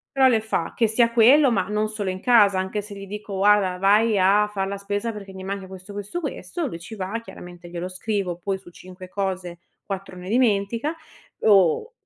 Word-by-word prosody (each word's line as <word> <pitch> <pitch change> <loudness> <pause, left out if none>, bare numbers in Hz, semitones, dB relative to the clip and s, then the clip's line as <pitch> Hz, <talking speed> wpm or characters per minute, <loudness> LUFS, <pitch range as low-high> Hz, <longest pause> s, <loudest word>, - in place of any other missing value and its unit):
Però 265 -1 +6
le 230 -4 +3
fa, 215 -6 -2
che 230 - +3
sia 230 +2 +2
quello, 250 +4 +6
ma 190 -5 0
non 210 +1 -1
solo 210 -3 -3
in 185 0 -4
casa, 210 -6 +5
anche 190 +3 -2
se 205 0 -10
gli 195 0 -8
dico: 210 0 -7
"Guarda 195 -2 +3
vai 210 +3 +3
a 200 +3 +4
far 195 -2 -3
la 200 +1 -4
spesa 205 +3 -3
perché 200 -2 -9
mi 190 0 -9
manca 195 0 -5
questo, 190 +1 -11
questo, 205 - -5
questo", 295 - -4
lui 190 - -5
ci 180 +7 -9
va, 200 +3 -3
chiaramente 175 -5 -11
glielo 175 +1 -5
scrivo 185 -1 -3
poi 190 +2 -3
su 190 -2 -15
5 185 +1 -12
cose, 185 -3 -3 0.3
4 195 -1 -6
ne 180 0 -9
dimentica 230 +4 +1 0.5
o 200 - +4
200 Hz, 205 wpm, -23 LUFS, 185-220 Hz, 0.5 s, Però